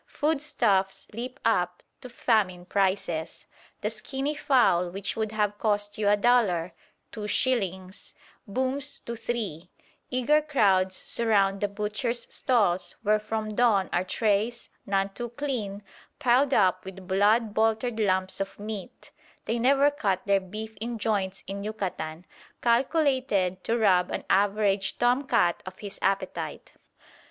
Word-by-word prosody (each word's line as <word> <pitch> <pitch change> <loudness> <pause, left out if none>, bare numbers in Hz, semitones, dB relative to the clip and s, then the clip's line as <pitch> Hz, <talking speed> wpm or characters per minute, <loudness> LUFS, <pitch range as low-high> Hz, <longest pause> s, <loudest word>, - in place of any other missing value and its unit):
Foodstuffs 235 -11 0
leap 250 +4 -6
up 180 -5 +1 0.2
to 250 - -9
famine 200 -7 +1
prices. 185 -4 -1 0.4
The - - -1
skinny 275 +2 -3
fowl 250 - +3
which 195 +2 -4
would 220 -1 -2
have 210 -1 -1
cost 205 -1 -1
you 205 -1 +2
a 205 - +4
dollar 200 -7 +2 0.4
(two 210 -2 -5
shillings) 195 -6 -1 0.3
"booms" 260 +6 -1
to 235 - -4
three; 215 -8 -4 0.4
eager 260 +5 +3
crowds 195 -11 +2
surround 200 -4 +1
the 205 - +2
butchers' 210 +4 -2
stalls 205 -9 +1
where 215 0 +3
from 215 0 -3
dawn 210 -4 +3
are 180 - +2
trays, 215 +4 0 0.2
none 195 0 +1
too 240 +4 -6
clean, 230 -6 -4 0.3
piled 255 +2 +3
up 185 -6 +3
with 190 -1 -10
blood 205 +3 +3
boltered 225 +2 +1
lumps 190 -2 +1
of 195 - -4
meat 210 -2 -8 0.3
(they 230 +2 -1
never 275 +4 +4
cut 200 -10 -1
their 200 -1 +3
beef 215 +4 -7
in 235 +1 -3
joints 200 -3 -1
in 200 +1 -5
Yucatan) 180 -6 -4 0.4
calculated 245 - +1
to 230 - 0
rob 185 -5 +3
an - - -3
average 200 0 +2
tom 250 +3 +2
cat 175 -9 +2
of 185 0 -8
his 205 -1 -9
appetite. 195 0 -2
210 Hz, 135 wpm, -27 LUFS, 195-240 Hz, 0.4 s, a